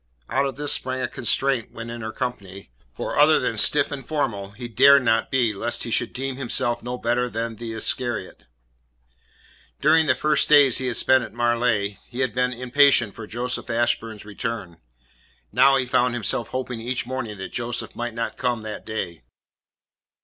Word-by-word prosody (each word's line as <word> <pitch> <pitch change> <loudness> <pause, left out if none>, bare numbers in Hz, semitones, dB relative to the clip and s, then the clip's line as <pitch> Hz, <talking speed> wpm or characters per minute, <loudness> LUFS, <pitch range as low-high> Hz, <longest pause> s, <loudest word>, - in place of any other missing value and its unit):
Out 135 +2 +1
of 135 - -5
this 145 0 +3
sprang 130 0 -1
a - - 0
constraint 130 +1 -1
when 115 0 -7
in 120 0 -7
her 110 0 -4
company, 100 - -6 0.2
for - - -4
other 155 +1 +6
than 120 - -1
stiff 140 +7 +3
and 140 -2 -5
formal 120 -9 -2
he 120 +4 -8
dared 140 +5 +6
not 115 -2 +2
be 120 -5 +1
lest 115 +4 -2
he 115 - -5
should 120 +1 +1
deem 135 0 -4
himself 120 -2 -1
no 125 +1 -5
better 125 +1 0
than 115 -1 -4
the 115 0 -6
Iscariot. 110 -2 -2 1.3
During 160 -1 +4
the - - +4
first 150 -1 +1
days 145 -4 +6
he 130 - -2
had 120 - -1
spent 130 -1 +4
at - - -9
Marleigh, 120 -4 0
he 125 +2 -4
had 130 -5 0
been 125 +1 +1
impatient 125 -2 +3
for 110 -2 -9
Joseph 125 +3 -3
Ashburn's 115 -2 -1
return. 105 -4 -5 0.7
Now 135 0 +5
he 130 - 0
found 125 0 +1
himself 115 +1 -1
hoping 125 -2 -4
each 125 +2 -2
morning 120 -4 -5
that 95 - -7
Joseph 120 0 -4
might 120 -1 -4
not 115 - -3
come 120 -3 -1
that 110 -1 -6
day. 90 - -5
120 Hz, 180 wpm, -23 LUFS, 115-130 Hz, 1.3 s, other